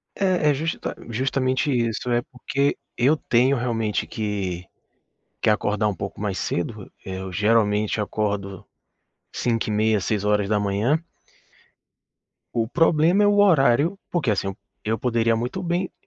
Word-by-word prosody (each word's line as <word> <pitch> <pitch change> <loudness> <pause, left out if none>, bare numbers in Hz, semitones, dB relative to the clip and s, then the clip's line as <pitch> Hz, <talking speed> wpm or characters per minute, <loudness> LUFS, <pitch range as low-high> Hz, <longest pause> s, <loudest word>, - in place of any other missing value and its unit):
É, 185 -6 +2
é - - +4
justa 160 +4 -3
justamente 130 +3 0
isso, 120 0 -1
é 120 0 +2
porque 140 +3 -1 0.2
eu 140 +6 +3
tenho 125 +2 +2
realmente 115 -3 -1
que 95 -5 -3 0.8
que - - +3
acordar 105 0 +1
um 100 - -1
pouco 100 0 -6
mais 100 -3 -2
cedo. 100 +3 -3
Eu 95 0 -6
geralmente 105 +1 +2
acordo 100 -2 -2 0.7
05:30, 110 -2 +1
06:00. 105 +5 +1 1.6
O 115 -2 0
problema 165 - +3
é - - +5
o 205 0 +3
horário, 160 -1 +4
porque 150 -11 0
assim 100 -1 -1 0.3
eu 110 +1 0
poderia 115 -2 +1
muito 125 +11 -3
bem 175 +1 -1
115 Hz, 125 wpm, -23 LUFS, 105-140 Hz, 1.6 s, é